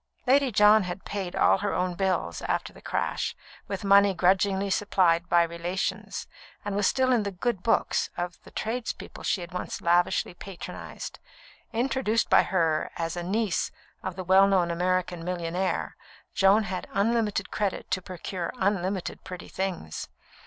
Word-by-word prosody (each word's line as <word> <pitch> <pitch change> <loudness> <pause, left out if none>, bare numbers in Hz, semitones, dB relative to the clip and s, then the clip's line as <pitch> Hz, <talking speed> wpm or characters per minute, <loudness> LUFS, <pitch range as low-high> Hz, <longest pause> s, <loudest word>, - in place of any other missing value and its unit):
Lady 270 0 +4
John 210 +1 +6
had 180 0 -5
paid 195 -3 -4
all - - +4
her 205 0 -1
own 180 0 0
bills 175 - -1
after - - -2
the - - -15
crash, - - -2 0.3
with 195 -1 -4
money 200 0 +5
grudgingly 190 +2 +2
supplied 175 -4 +2
by 170 0 +5
relations, 170 +2 -3 0.4
and 205 -1 -2
was 205 -1 +2
still 260 -1 +2
in 240 -3 +4
the 205 - -2
"good 195 +2 -2
books" 225 - +1
of 175 0 -4
the - - -13
tradespeople 230 +2 -4
she 190 - 0
had 175 +1 -8
once 180 - -4
lavishly 175 +1 +2
patronised. 185 0 -8 0.5
Introduced 235 -1 0
by - - +8
her 165 -4 +1
as 165 0 -2
a 175 - -3
niece 200 +2 0 0.3
of 190 -2 -4
the 185 - -5
well 190 +2 +6
known 185 -3 +2
American 180 0 0
millionaire, 180 +1 -2 0.4
Joan 200 +2 +5
had 185 -2 -4
unlimited 210 -1 +1
credit 205 -3 -2
to 185 - +1
procure 180 0 -5
unlimited 190 -3 -1
pretty 180 -1 -8
things. 185 - -4
190 Hz, 155 wpm, -27 LUFS, 175-205 Hz, 0.5 s, by